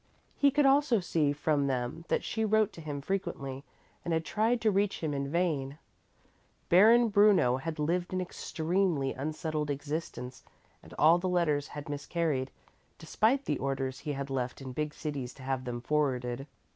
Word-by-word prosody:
He 285 - +4
could 285 +1 +2
also 270 -4 +4
see 160 -5 +1
from 145 -1 0
them 130 +5 -3
that - - 0
she 220 - -2
wrote 220 -1 +2
to 165 - -10
him 145 -2 -5
frequently 140 -7 -3 0.4
and 170 -2 0
had 160 0 -1
tried 225 +7 +1
to 220 - +3
reach 200 0 0
him 155 -2 -1
in 140 0 -2
vain. 150 -4 -1 0.9
Baron 225 +6 +6
Bruno 205 - +4
had 160 +4 -5
lived 175 +4 -1
an 185 - -1
extremely 175 -4 -1
unsettled 155 +1 -3
existence 145 -3 -4 0.4
and - - -14
all 165 +3 +6
the 185 +1 -1
letters 155 -5 +1
had 145 -1 -8
miscarried, 145 -2 -2 0.5
despite 225 - +1
the - - -1
orders 135 -1 -2
he 150 - -4
had 140 0 -5
left 125 -2 -2
in 130 -2 -7
big 150 +2 -3
cities 140 -5 -5
to 135 - -12
have 130 -1 -2
them 120 -1 -4
forwarded. 130 -2 -1
150 Hz, 170 wpm, -30 LUFS, 135-185 Hz, 0.9 s, Baron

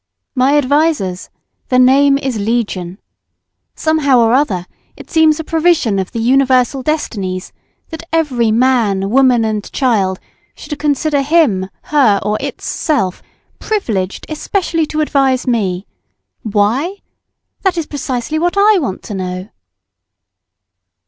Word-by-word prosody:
"My 270 +2 +3
advisers! 285 - 0 0.4
Their 255 - +2
name 275 +2 +5
is 265 -5 -3
legion. 200 -4 -2 0.8
Somehow 310 -4 +2
or 230 0 +3
other, 215 -10 +1 0.3
it - - -13
seems 320 -1 +3
a - - -3
provision 320 - +1
of 190 - -4
the - - -6
universal 260 +1 +2
destinies, 200 -11 -3 0.4
that 320 -1 -7
every 265 -9 +1
man, 220 -5 +1
woman, 250 -3 +4
and 215 -2 -3
child 200 -8 0 0.4
should 295 -2 -8
consider 295 0 +1
him, 275 - +2
her, 260 -10 +3
or 210 +1 -1
itself 250 - -2 0.4
privileged 215 - -2
especially 330 0 -1
to 310 +1 -2
advise 270 -4 +1
me. 200 -7 -1 0.6
Why? 225 - 0 0.6
That 380 -3 0
is 330 - -1
precisely 275 +1 -3
what 350 +4 0
I 410 0 +5
want 240 - -4
to - - -7
know." 185 0 -5
255 Hz, 120 wpm, -15 LUFS, 210-305 Hz, 0.8 s, name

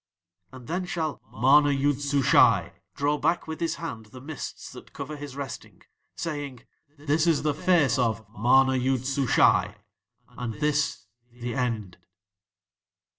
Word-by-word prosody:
"'And 130 -2 -12
then 180 +6 -3
shall 160 -6 -3
MANA 145 +6 +5
YOOD 140 0 0
SUSHAI 140 -2 +4 0.2
draw 145 +1 0
back 165 +3 0
with 160 0 -5
his 165 -1 -1
hand 115 -10 -7
the 125 +4 -12
mists 145 +2 -7
that - - -13
cover 145 +2 -6
his 145 -2 -8
resting, 140 -1 -8 0.3
saying: 145 -6 -5 0.3
"This 155 +3 0
is 160 -4 +2
the 150 -1 +1
Face 145 -5 +2
of 110 -3 0
MANA 130 +4 +4
YOOD 130 0 0
SUSHAI 135 -3 +3 0.5
and 120 -3 -6
this 150 -3 -1 0.3
THE 120 0 -6
END."'" 115 -8 -3
140 Hz, 135 wpm, -26 LUFS, 125-150 Hz, 0.5 s, MANA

